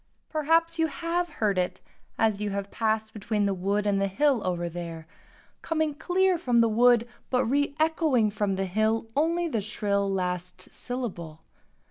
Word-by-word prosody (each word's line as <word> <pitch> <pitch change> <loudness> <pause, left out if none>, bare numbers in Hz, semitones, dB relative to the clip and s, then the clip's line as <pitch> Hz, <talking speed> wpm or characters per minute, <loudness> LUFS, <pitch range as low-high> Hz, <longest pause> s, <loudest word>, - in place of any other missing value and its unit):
Perhaps 330 +2 +1
you 325 - +3
have 335 +4 -2
heard 210 - 0
it 180 - -2 0.4
as 215 -2 +1
you 210 - -1
have 200 0 -4
passed 220 -1 -1
between 210 0 -1
the 200 - +1
wood 200 +3 -1
and 200 -1 +1
the 195 - +2
hill 265 +5 +2
over 175 -1 -1
there, 170 -1 -6 0.6
coming 315 -2 0
clear 360 +4 +1
from 245 -7 +2
the 230 - +5
wood 235 +1 +4 0.2
but 250 0 +2
reëchoing 285 -3 +1
from 205 -2 0
the 190 0 -1
hill 215 +4 +1
only 335 +4 +1
the 230 -9 -1
shrill 200 -1 -1
last 180 -1 -3
syllable. 180 -11 -6
220 Hz, 160 wpm, -27 LUFS, 195-295 Hz, 0.6 s, the